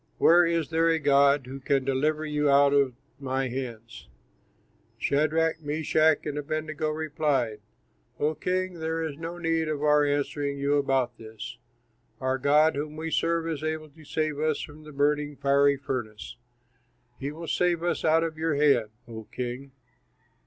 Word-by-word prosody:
Where 170 Hz, -, +6 dB
is 165 Hz, -3 st, 0 dB
there 165 Hz, +1 st, +2 dB
a 165 Hz, -, +3 dB
god 140 Hz, -2 st, +4 dB
who 135 Hz, +2 st, -8 dB
can 135 Hz, -1 st, 0 dB
deliver 150 Hz, +4 st, 0 dB
you 150 Hz, -1 st, 0 dB
out 140 Hz, 0 st, +5 dB
of 140 Hz, -3 st, +2 dB, 0.2 s
my 135 Hz, -1 st, -2 dB
hands?" 120 Hz, -2 st, -7 dB, 0.9 s
Shadrach, 160 Hz, +3 st, +1 dB
Meshach, 155 Hz, +1 st, +2 dB
and 150 Hz, -1 st, -3 dB
Abednego 155 Hz, +1 st, -3 dB
replied, 150 Hz, -7 st, -1 dB, 0.6 s
"O 150 Hz, +2 st, +1 dB
king, 180 Hz, +2 st, -2 dB
there 160 Hz, 0 st, -2 dB
is 155 Hz, -3 st, -4 dB
no 165 Hz, +1 st, -5 dB
need 165 Hz, -1 st, 0 dB
of 150 Hz, -1 st, -2 dB
our 150 Hz, 0 st, +4 dB
answering 145 Hz, 0 st, -1 dB
you 140 Hz, +1 st, 0 dB
about 135 Hz, -3 st, 0 dB
this. 110 Hz, -1 st, -9 dB, 0.6 s
Our 130 Hz, 0 st, -1 dB
God 150 Hz, +3 st, +4 dB
whom 150 Hz, +1 st, -4 dB
we 160 Hz, +1 st, -4 dB
serve 165 Hz, 0 st, +1 dB
is 155 Hz, -2 st, -3 dB
able 155 Hz, 0 st, -3 dB
to 155 Hz, +2 st, -17 dB
save 155 Hz, 0 st, -2 dB
us 155 Hz, -1 st, 0 dB
from 150 Hz, +1 st, -9 dB
the 155 Hz, -, -10 dB
burning, 145 Hz, +1 st, 0 dB
fiery 140 Hz, +1 st, +3 dB
furnace; 110 Hz, -, -5 dB, 0.8 s
he 140 Hz, +2 st, -3 dB
will 165 Hz, +2 st, -8 dB
save 175 Hz, -1 st, +1 dB
us 175 Hz, -, -1 dB
out 160 Hz, +1 st, +4 dB
of 160 Hz, -1 st, -4 dB
your 160 Hz, -2 st, 0 dB
hand, 140 Hz, -7 st, +3 dB, 0.2 s
O 110 Hz, -2 st, -8 dB
king. 125 Hz, +2 st, -5 dB
150 Hz, 160 wpm, -27 LUFS, 140-160 Hz, 0.9 s, Where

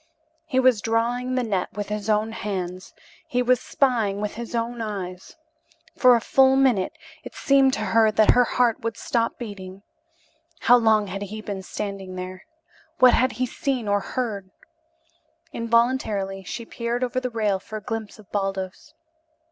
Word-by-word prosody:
He 260 Hz, -5 st, +1 dB
was 255 Hz, -5 st, +4 dB
drawing 240 Hz, +3 st, 0 dB
the 255 Hz, -, +1 dB
net 200 Hz, -5 st, -2 dB
with 205 Hz, 0 st, -5 dB
his 210 Hz, 0 st, -3 dB
own 215 Hz, +1 st, +2 dB
hands, 185 Hz, -4 st, -5 dB, 0.3 s
he 250 Hz, 0 st, 0 dB
was 250 Hz, 0 st, +3 dB
spying 225 Hz, -7 st, +1 dB
with 210 Hz, 0 st, -3 dB
his 235 Hz, +1 st, -6 dB
own 235 Hz, 0 st, -2 dB
eyes. 190 Hz, -4 st, -6 dB, 0.6 s
For 250 Hz, -2 st, +6 dB
a -, -, +2 dB
full 265 Hz, +3 st, +4 dB
minute 255 Hz, -8 st, +2 dB, 0.3 s
it -, -, -10 dB
seemed 275 Hz, -2 st, +3 dB
to 215 Hz, -, -2 dB
her 220 Hz, +2 st, +3 dB
that 215 Hz, 0 st, +4 dB
her 245 Hz, -, +4 dB
heart 240 Hz, -1 st, +1 dB
would 230 Hz, 0 st, -3 dB
stop 235 Hz, -4 st, -1 dB
beating. 195 Hz, -4 st, -8 dB, 0.8 s
How 245 Hz, -, +6 dB
long 220 Hz, -3 st, +3 dB
had 195 Hz, +1 st, -6 dB
he 205 Hz, +2 st, -6 dB
been 205 Hz, -3 st, -5 dB
standing 195 Hz, -1 st, -6 dB
there? 185 Hz, +3 st, -7 dB, 0.5 s
What 255 Hz, -1 st, +7 dB
had 255 Hz, +2 st, +2 dB
he 255 Hz, +3 st, -1 dB
seen 260 Hz, -3 st, -2 dB
or 205 Hz, 0 st, +2 dB
heard? 205 Hz, -4 st, -4 dB, 1.0 s
Involuntarily 230 Hz, -5 st, 0 dB
she 230 Hz, +5 st, -6 dB
peered 235 Hz, +2 st, -3 dB
over 255 Hz, 0 st, -1 dB
the 255 Hz, 0 st, -3 dB
rail 215 Hz, -4 st, 0 dB
for 215 Hz, +3 st, -7 dB
a 210 Hz, -, -9 dB
glimpse 225 Hz, -2 st, -5 dB
of 215 Hz, -3 st, -16 dB
Baldos. 195 Hz, -2 st, -4 dB
220 Hz, 165 wpm, -24 LUFS, 200-245 Hz, 1.0 s, What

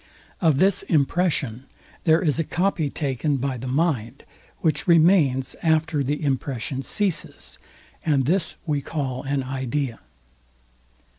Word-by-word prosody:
Of 160 Hz, -6 st, +4 dB
this 190 Hz, +4 st, +3 dB
impression 145 Hz, -5 st, 0 dB, 0.4 s
there 160 Hz, +1 st, +4 dB
is 155 Hz, -2 st, +1 dB
a -, -, +2 dB
copy 175 Hz, -2 st, 0 dB
taken 140 Hz, 0 st, -1 dB
by 135 Hz, 0 st, -2 dB
the 125 Hz, +2 st, -6 dB
mind, 130 Hz, -5 st, -1 dB, 0.4 s
which 155 Hz, 0 st, 0 dB
remains 160 Hz, -6 st, +4 dB
after 160 Hz, -2 st, +2 dB
the 145 Hz, +4 st, -2 dB
impression 135 Hz, -1 st, -2 dB
ceases; 195 Hz, +4 st, -2 dB, 0.4 s
and 140 Hz, -5 st, +2 dB
this 170 Hz, +4 st, 0 dB
we 150 Hz, -3 st, 0 dB
call 135 Hz, -3 st, -3 dB
an 140 Hz, -1 st, -1 dB
idea. 130 Hz, -1 st, -3 dB
145 Hz, 125 wpm, -24 LUFS, 130-165 Hz, 0.4 s, Of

